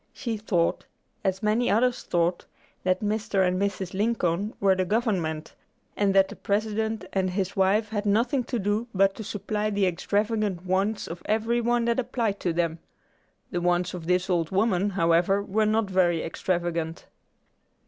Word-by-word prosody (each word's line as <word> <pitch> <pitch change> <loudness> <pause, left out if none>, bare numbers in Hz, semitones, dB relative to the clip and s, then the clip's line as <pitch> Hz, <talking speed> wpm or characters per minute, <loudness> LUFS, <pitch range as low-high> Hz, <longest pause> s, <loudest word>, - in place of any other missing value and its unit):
She 235 -4 -3
thought, 190 -6 0 0.4
as 190 +2 -1
many 220 +3 +2
others 245 +3 +2
thought, 175 +1 0 0.4
that 185 0 +1
Mr. 210 -2 +1
and 185 +1 0
Mrs. 195 -2 -2
Lincoln 200 -1 0
were 195 -1 +4
the 185 0 0
government, 185 -7 -1 0.4
and 200 -1 +1
that 195 0 +6
the - - -8
President 220 +2 -1
and 190 -1 +1
his 190 0 -2
wife 200 +3 +2
had 210 -1 -2
nothing 240 +6 +2
to 245 - -2
do 210 +3 -1
but 195 +1 +4
to 220 - -7
supply 210 +1 -2
the 200 -2 +1
extravagant 205 +1 -1
wants 195 +4 0
of 170 +1 -7
every 225 +3 +1
one 240 0 +1
that 235 +1 +1
applied 230 -5 -1
to 175 - 0
them. 165 -1 -1 0.7
The 175 - -1
wants 175 +1 +1
of 170 -3 -7
this 180 +1 +2
old 170 -3 0
woman, 195 -1 +1
however, 180 +1 +2
were 215 +2 +1
not 215 0 +1
very 180 -3 +2
extravagant. 170 -1 -2
195 Hz, 165 wpm, -26 LUFS, 180-215 Hz, 0.7 s, that